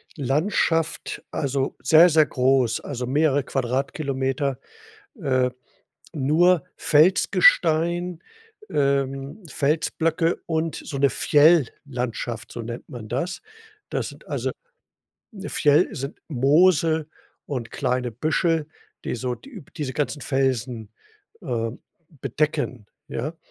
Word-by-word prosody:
Landschaft, 160 Hz, +3 st, 0 dB
also, 140 Hz, -3 st, -1 dB
sehr, 165 Hz, +3 st, +7 dB
sehr 155 Hz, -1 st, +5 dB
groß, 130 Hz, -2 st, +2 dB
also, 125 Hz, -3 st, -4 dB
mehrere 145 Hz, 0 st, +2 dB
Quadratkilometer, 135 Hz, +1 st, -1 dB, 0.6 s
äh, 130 Hz, -3 st, +2 dB, 0.6 s
nur 160 Hz, +4 st, +3 dB
Felsgestein, 170 Hz, -, +3 dB, 0.5 s
ähm, 140 Hz, +4 st, -1 dB
Felsblöcke 160 Hz, +3 st, 0 dB
und 160 Hz, 0 st, -1 dB
so 140 Hz, -, -6 dB
'ne 140 Hz, 0 st, +4 dB
Fjell-Landschaft, 130 Hz, -7 st, +1 dB
so 120 Hz, -, -6 dB
nennt 115 Hz, +1 st, -7 dB
man 115 Hz, -4 st, -8 dB
das. 170 Hz, +9 st, -3 dB, 0.5 s
Das -, -, -2 dB
sind -, -, -15 dB
also, -, -, -2 dB, 0.8 s
'ne 200 Hz, -2 st, -8 dB
Fjell 150 Hz, +3 st, +4 dB
sind 135 Hz, +3 st, -6 dB
Moose 155 Hz, +3 st, +3 dB, 0.4 s
und 125 Hz, -5 st, -4 dB
kleine 125 Hz, -1 st, -1 dB
Büschel, 155 Hz, -, 0 dB, 0.4 s
die -, -, -2 dB
so 125 Hz, +2 st, -2 dB
die 245 Hz, -, -12 dB
diese 135 Hz, -4 st, -3 dB
ganzen 145 Hz, -1 st, -2 dB
Felsen, 125 Hz, -5 st, -1 dB, 0.5 s
äh, 115 Hz, -7 st, -2 dB, 0.4 s
bedecken, 145 Hz, -4 st, -2 dB, 0.2 s
ja? 160 Hz, +3 st, -4 dB
145 Hz, 100 wpm, -24 LUFS, 130-160 Hz, 0.8 s, sehr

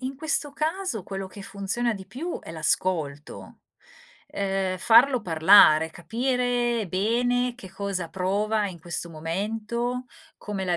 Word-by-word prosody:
in 260 Hz, +1 st, -4 dB
questo 305 Hz, -1 st, 0 dB
caso 320 Hz, -, -2 dB
quello 195 Hz, +1 st, -6 dB
che 195 Hz, +2 st, -11 dB
funziona 200 Hz, +5 st, -1 dB
di 195 Hz, -2 st, -8 dB
più 285 Hz, -, -5 dB
è -, -, -10 dB
l'ascolto, 155 Hz, -2 st, -2 dB, 0.7 s
ehm, 195 Hz, -1 st, -2 dB
farlo 240 Hz, +5 st, +5 dB
parlare, 160 Hz, -1 st, +6 dB
capire 240 Hz, +3 st, -1 dB
bene 245 Hz, +6 st, 0 dB
che 190 Hz, -6 st, -10 dB
cosa 190 Hz, -3 st, -4 dB
prova 205 Hz, +3 st, 0 dB
in 175 Hz, -, -9 dB
questo 170 Hz, +1 st, -4 dB
momento, 220 Hz, +9 st, -3 dB, 0.3 s
come 200 Hz, -2 st, -5 dB
la 180 Hz, -2 st, 0 dB
200 Hz, 130 wpm, -25 LUFS, 185-245 Hz, 0.7 s, parlare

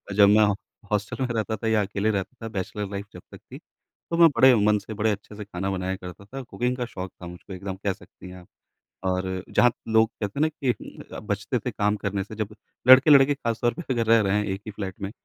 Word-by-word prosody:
जब 100 Hz, -1 st, +7 dB
मैं 105 Hz, +1 st, +6 dB, 0.5 s
हॉस्टल 105 Hz, +5 st, -1 dB
में -, -, 0 dB
रहता 110 Hz, 0 st, -1 dB
था, 115 Hz, -, -4 dB
या 110 Hz, -1 st, +3 dB
अकेले 100 Hz, +2 st, -1 dB
रहता 100 Hz, +4 st, -3 dB
था, -, -, -3 dB
बैचलर 100 Hz, 0 st, -4 dB
लाइफ़ 100 Hz, 0 st, -4 dB
जब 90 Hz, -, -10 dB
तक -, -, -10 dB
थी, -, -, -7 dB, 0.5 s
तो 170 Hz, -, 0 dB
मैं 165 Hz, -1 st, +8 dB
बड़े 130 Hz, -1 st, +8 dB
मन 105 Hz, -1 st, +3 dB
से, 110 Hz, +2 st, -8 dB
बड़े 110 Hz, +1 st, +1 dB
अच्छे 105 Hz, +1 st, -6 dB
से 105 Hz, -, -6 dB
खाना 95 Hz, -1 st, -4 dB
बनाया 95 Hz, 0 st, -2 dB
करता 90 Hz, +1 st, -10 dB
था। 135 Hz, +6 st, -7 dB
कुकिंग 125 Hz, 0 st, -2 dB
का 125 Hz, -, -2 dB
शौक 95 Hz, -5 st, -7 dB
था 90 Hz, -, -7 dB
मुझको 90 Hz, +2 st, -10 dB
एकदम, 95 Hz, +1 st, -5 dB
कह 95 Hz, 0 st, -2 dB
सकती 90 Hz, -, -14 dB
हैं 90 Hz, -, -10 dB
आप। 90 Hz, -, -17 dB, 0.6 s
और 95 Hz, 0 st, -1 dB
जहाँ 125 Hz, -, +4 dB, 0.2 s
लोग, 110 Hz, 0 st, +4 dB
कहते 105 Hz, +7 st, -3 dB
हैं -, -, +4 dB
ना 155 Hz, -, +4 dB
कि 140 Hz, -4 st, -2 dB, 0.5 s
अ, -, -, -6 dB
बचते -, -, -2 dB
थे -, -, -4 dB
काम 105 Hz, +1 st, 0 dB
करने 100 Hz, -1 st, -2 dB
से, 110 Hz, -, -10 dB
जब 105 Hz, 0 st, -4 dB, 0.3 s
लड़के-लड़के 140 Hz, +1 st, +8 dB
ख़ासतौर 120 Hz, -2 st, -1 dB
पे -, -, -4 dB
अगर 115 Hz, -2 st, 0 dB
रह 115 Hz, 0 st, +6 dB
रहे 100 Hz, 0 st, +1 dB
हैं 105 Hz, -, 0 dB
एक 95 Hz, -1 st, -3 dB
ही 110 Hz, -, -4 dB
फ्लैट 95 Hz, -2 st, -5 dB
में, 100 Hz, 0 st, -4 dB
105 Hz, 245 wpm, -25 LUFS, 95-115 Hz, 0.6 s, मैं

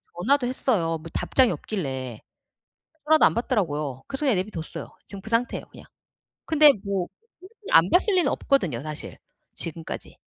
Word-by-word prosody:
전화도 250 Hz, +9 st, +2 dB
했어요. 200 Hz, -10 st, 0 dB
뭐 -, -, -16 dB
답장이 255 Hz, -3 st, +2 dB
없길래. 130 Hz, -, -4 dB, 0.8 s
전화도 315 Hz, 0 st, +6 dB
안 -, -, +4 dB
받더라고요. 150 Hz, -, -1 dB
그래서 275 Hz, +2 st, -4 dB
그냥 260 Hz, -7 st, +3 dB
내비뒀어요. 180 Hz, -4 st, -5 dB
지금 200 Hz, -1 st, -9 dB
그 220 Hz, -, -9 dB
상태예요 235 Hz, +2 st, 0 dB
그냥. -, -, -14 dB, 0.6 s
근데 305 Hz, -2 st, +7 dB
뭐 195 Hz, -3 st, -2 dB, 0.3 s
솔직히 400 Hz, +3 st, -15 dB
안 165 Hz, +3 st, +6 dB
봤을 390 Hz, +3 st, +3 dB
리는 360 Hz, -2 st, +3 dB
없거든요 180 Hz, -, 0 dB
사실. 155 Hz, 0 st, -7 dB, 0.4 s
지금까지. 165 Hz, -1 st, -7 dB
200 Hz, 360 characters per minute, -25 LUFS, 165-275 Hz, 0.8 s, 근데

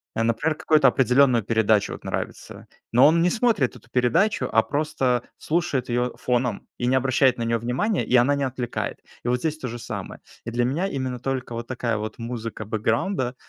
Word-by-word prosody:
э, 115 Hz, -, +1 dB
например, 115 Hz, +8 st, 0 dB
какую-то 155 Hz, -2 st, +4 dB
определенную 125 Hz, -2 st, +3 dB
передачу- 110 Hz, -1 st, +2 dB
вот -, -, -10 dB
нравится. -, -, -5 dB, 0.3 s
Но 125 Hz, +4 st, +7 dB
он 165 Hz, +2 st, +4 dB
не 175 Hz, -, +3 dB
смотрит 220 Hz, -, +1 dB
эту 115 Hz, -, -22 dB
передачу, 170 Hz, -, +2 dB
а 115 Hz, -, +4 dB
просто 140 Hz, -4 st, 0 dB, 0.2 s
слушает 155 Hz, -7 st, -1 dB
её 120 Hz, +1 st, -1 dB
фоном 125 Hz, -3 st, -1 dB
и 120 Hz, -, 0 dB
не 130 Hz, -, +3 dB
обращает 130 Hz, -1 st, +3 dB
на 115 Hz, -, -2 dB
неё 115 Hz, 0 st, 0 dB
внимания, 130 Hz, -, -1 dB
и -, -, +1 dB
она 130 Hz, +4 st, +4 dB
не 140 Hz, -1 st, 0 dB
отвлекает. 125 Hz, -2 st, -4 dB, 0.3 s
И -, -, 0 dB
вот 125 Hz, 0 st, +1 dB
здесь 155 Hz, +3 st, -2 dB
то 130 Hz, -, -4 dB
же 120 Hz, 0 st, -5 dB
самое. -, -, -7 dB, 0.2 s
И 115 Hz, -, -4 dB
для 120 Hz, +1 st, +1 dB
меня 160 Hz, +10 st, 0 dB
именно 130 Hz, -5 st, -3 dB
только 130 Hz, -1 st, -3 dB
вот 115 Hz, 0 st, -5 dB
такая 120 Hz, -3 st, -2 dB
вот 110 Hz, +1 st, -5 dB
музыка 115 Hz, -2 st, -5 dB
бэкграунда, 120 Hz, -, -1 dB
125 Hz, 195 wpm, -24 LUFS, 115-140 Hz, 0.3 s, Но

